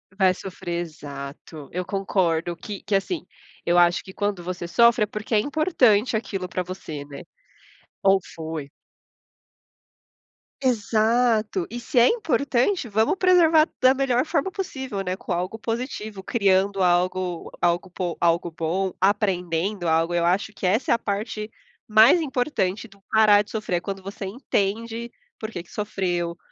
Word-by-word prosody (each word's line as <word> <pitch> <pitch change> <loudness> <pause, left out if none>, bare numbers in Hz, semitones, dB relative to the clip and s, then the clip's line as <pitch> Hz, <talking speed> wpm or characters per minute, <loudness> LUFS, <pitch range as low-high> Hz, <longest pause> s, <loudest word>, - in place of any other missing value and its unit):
Vai 190 -2 +4
sofrer. 175 -2 -5
Exato. 145 -2 -9
Eu 180 +1 -3
concordo 175 -4 0
que 200 +4 -7
que 205 - 0
assim, 255 - -1 0.4
eu 175 +1 +3
acho 175 0 +4
que 190 - -11
quando 205 -3 -2
você 175 -1 -5
sofre 235 +5 +4
é - - +3
porque 215 +2 -6
é - - +5
importante 260 - +2
aquilo 195 -4 -3
para 180 0 -3
você, 165 -5 -7
né? 140 -1 -9 0.8
Ou 195 0 +5
foi. 160 -3 -5 1.9
Exato. 220 -4 +1
E 240 - -5
se 240 +2 +1
é 235 - +7
importante, 300 - +1
vamos 220 - +2
preservar 335 -4 +5
da 255 0 +6
melhor 265 -1 +1
forma 320 +3 -1
possível, 265 - -4
né, 180 0 -2
com 190 - -8
algo 180 +6 -3
positivo, 220 -3 -4
criando 195 -2 +2
algo 180 0 0
algo 175 +2 +1
po 180 -1 -4
algo 170 0 +1
bom, 170 +4 -2
aprendendo 190 -2 0
algo. 165 +1 +2
Eu 170 -1 +1
acho 190 +5 +1
que 200 - -5
essa 215 +8 +2
é - - +7
a - - -3
parte 215 0 -4 0.4
mais 220 +10 +6
importante 245 - -1
do 200 -2 -21
parar 215 -2 +6
de 210 - -16
sofrer. 215 -5 -1
É - - -4
quando 195 +1 -5
você 195 +1 -6
entende 230 +1 -2 0.3
por 220 0 -5
que 175 - -6
que - - -22
sofreu, 175 -5 -2
200 Hz, 155 wpm, -24 LUFS, 175-230 Hz, 1.9 s, é